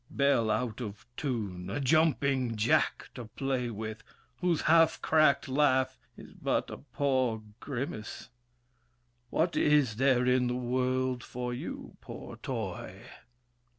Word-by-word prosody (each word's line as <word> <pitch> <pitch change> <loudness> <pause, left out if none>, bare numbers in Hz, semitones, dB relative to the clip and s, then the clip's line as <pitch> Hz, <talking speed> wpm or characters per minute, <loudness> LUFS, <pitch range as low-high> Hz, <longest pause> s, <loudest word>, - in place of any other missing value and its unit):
Bell 140 -5 +2
out 110 +2 -1
of 105 -3 -7
tune, 100 - -3
a 120 - -2
jumping 140 -4 +2
jack 110 +2 +1
to 120 - -7
play 125 +2 -2
with, 110 0 -6 0.4
Whose 175 -3 +1
half 165 0 +4
cracked 155 -3 +3
laugh 130 -1 +2 0.2
is - - -12
but - - -1
a - - -6
poor 130 -5 0 0.2
grimace! 125 -4 -5 1.0
What 165 +6 +1
is 145 -7 +3
there 130 -1 +3
in 125 0 +3
the 125 - -1
world 125 0 0
for 125 0 -4
you, 120 - -7
poor - - -9
toy? - - -5
130 Hz, 125 wpm, -30 LUFS, 115-140 Hz, 1.0 s, half